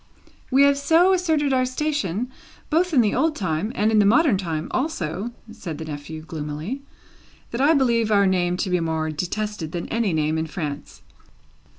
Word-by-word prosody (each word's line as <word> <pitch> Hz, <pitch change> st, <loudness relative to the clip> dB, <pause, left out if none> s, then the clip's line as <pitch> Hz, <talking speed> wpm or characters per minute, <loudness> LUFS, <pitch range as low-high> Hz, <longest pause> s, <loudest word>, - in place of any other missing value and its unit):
"We 270 Hz, +1 st, +5 dB
have 280 Hz, 0 st, +4 dB
so 330 Hz, +6 st, +4 dB
asserted 315 Hz, -6 st, +1 dB
our 255 Hz, -1 st, +3 dB
station, 255 Hz, -, -2 dB, 0.4 s
both 350 Hz, +3 st, +2 dB
in 270 Hz, -6 st, +5 dB
the 210 Hz, -3 st, +1 dB
old 315 Hz, -1 st, +1 dB
time 185 Hz, -, -2 dB
and 215 Hz, +2 st, +2 dB
in 215 Hz, -, +4 dB
the 205 Hz, -, +5 dB
modern 275 Hz, +2 st, +4 dB
time 170 Hz, -4 st, -3 dB
also," 210 Hz, -, -2 dB, 0.2 s
said 190 Hz, -9 st, -7 dB
the 160 Hz, -, -6 dB
nephew, 155 Hz, +1 st, -7 dB
gloomily, 160 Hz, -, -5 dB, 0.7 s
"that 235 Hz, -, -2 dB
I 305 Hz, +4 st, +5 dB
believe 235 Hz, -5 st, +2 dB
our 200 Hz, -1 st, +5 dB
name 180 Hz, -2 st, +1 dB
to 185 Hz, -, -4 dB
be 180 Hz, -, +2 dB
more 160 Hz, -1 st, -1 dB
detested 180 Hz, +1 st, -4 dB
than 170 Hz, -1 st, -4 dB
any 230 Hz, -4 st, 0 dB
name 155 Hz, 0 st, 0 dB
in 160 Hz, -, -2 dB
France." 150 Hz, -4 st, -6 dB
205 Hz, 180 wpm, -23 LUFS, 160-270 Hz, 0.7 s, We